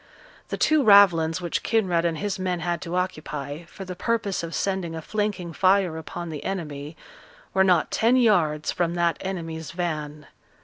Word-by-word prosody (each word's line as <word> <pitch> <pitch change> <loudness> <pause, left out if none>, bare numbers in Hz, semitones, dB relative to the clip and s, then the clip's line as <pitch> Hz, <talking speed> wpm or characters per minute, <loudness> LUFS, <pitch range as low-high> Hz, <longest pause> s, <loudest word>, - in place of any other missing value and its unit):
The - - -4
two 310 -2 +3
ravelins 185 -6 +6
which 175 -2 -2
Kinraid 185 -7 +1
and 165 -2 0
his 200 +2 -3
men 180 -2 -2
had 175 -1 -2
to 170 0 -4
occupy, 155 -4 -4
for 195 +3 -10
the 180 -1 -6
purpose 210 -1 -1
of 165 0 -5
sending 190 -4 -2
a - - -4
flanking 205 -5 -2
fire 185 -1 +3
upon 165 +1 -6
the 150 - -6
enemy, 150 -5 -5 0.6
were 190 - +4
not 180 -4 +3
ten 230 +3 +3
yards 170 -11 +2
from 175 -1 -1
that 170 -1 +1
enemy's 165 -4 -5
van. 155 -4 -4
175 Hz, 170 wpm, -25 LUFS, 160-190 Hz, 0.6 s, ravelins